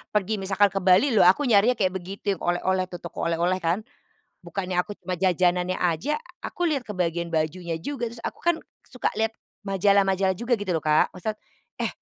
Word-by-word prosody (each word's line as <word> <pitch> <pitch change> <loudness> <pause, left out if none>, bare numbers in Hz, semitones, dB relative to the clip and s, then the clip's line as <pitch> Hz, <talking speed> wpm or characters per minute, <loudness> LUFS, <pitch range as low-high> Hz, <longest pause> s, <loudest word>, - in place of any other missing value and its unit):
pergi 210 +1 +1
misalkan 195 +1 +2
ke 195 - -1
Bali 190 +9 +4
loh 215 -6 +6
aku 190 +11 +4
nyarinya 240 -1 +4
kayak 190 -5 +1
begitu 195 +1 -4
yang - - -26
oleh-oleh 185 +1 0
tuh 175 -1 -9
toko - - -4
oleh-oleh 170 +2 +1
kan? 175 +5 0 0.6
Bukannya 185 -2 -4
aku 195 - -10
j - - -72
mah 185 - -1
j 185 +2 +2
jajanannya 180 +1 +1
aja 180 - 0
a 355 +3 -10
aku 350 - -1
lihat 285 -5 0
ke 215 - -7
bagian 170 -3 -1
bajunya 165 +1 -1
juga 240 - -3
terus 235 - -8
aku - - -5
kan 345 0 +3 0.3
suka 250 - -3
lihat 225 0 +1 0.3
majalah-majalah 195 -1 +2
juga 235 +4 0
gitu 195 -3 -2
loh 160 - -2
Kak. 155 +3 +3
Maksud 185 +4 -2 0.5
eh, - - +1
190 Hz, 205 wpm, -25 LUFS, 175-215 Hz, 0.6 s, loh